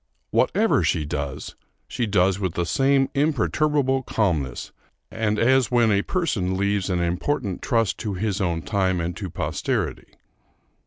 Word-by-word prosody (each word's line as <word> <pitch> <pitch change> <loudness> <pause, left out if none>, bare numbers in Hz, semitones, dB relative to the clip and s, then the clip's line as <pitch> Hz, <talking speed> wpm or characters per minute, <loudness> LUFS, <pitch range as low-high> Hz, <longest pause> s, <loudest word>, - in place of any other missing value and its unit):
Whatever - - +2
she 75 - 0
does, 70 -2 -4 0.3
she 120 - -2
does 95 -1 +2
with 95 -4 -2
the 85 - 0
same 135 - +2
imperturbable 145 -1 +1
calmness, 80 - -1 0.4
and 105 -1 -1
as 130 +2 +3
when 120 -3 +3
a 100 0 +3
person 100 - -1
leaves 100 0 0
an 90 -2 0
important 95 +4 -1
trust 115 -4 0
to 105 -3 -3
his 105 +1 -2
own 85 -3 -1
time 95 -3 0
and 85 +1 -3
to 95 +1 -5
posterity. - - -3
100 Hz, 145 wpm, -23 LUFS, 90-125 Hz, 0.4 s, as